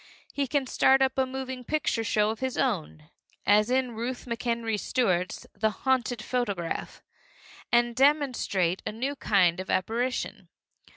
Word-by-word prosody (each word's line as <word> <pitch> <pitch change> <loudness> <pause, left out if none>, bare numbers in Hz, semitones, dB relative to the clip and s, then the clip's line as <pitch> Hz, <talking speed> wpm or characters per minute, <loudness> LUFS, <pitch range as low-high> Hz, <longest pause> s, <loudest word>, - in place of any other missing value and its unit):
He 280 -1 -1
can 280 +1 0
start 265 +1 +4
up 265 0 +1
a 265 -1 +1
moving 260 -1 -5
picture 290 -4 0
show 210 -1 +2
of 220 - -6
his 260 -1 -2
own, 165 - -2 0.3
as 210 +3 +4
in 255 -1 +1
Ruth 240 +3 -4
McEnery 230 -2 -2
Stuart's 185 -8 0
The 220 +2 +1 0.2
Haunted 250 -3 +1
Photograph, 205 -9 -3 0.7
and 240 0 +3
demonstrate 255 - +2
a - - -3
new 260 +6 -3
kind 185 -9 +2
of 190 - -6
apparition. 235 +7 -1
240 Hz, 140 wpm, -27 LUFS, 210-260 Hz, 0.7 s, start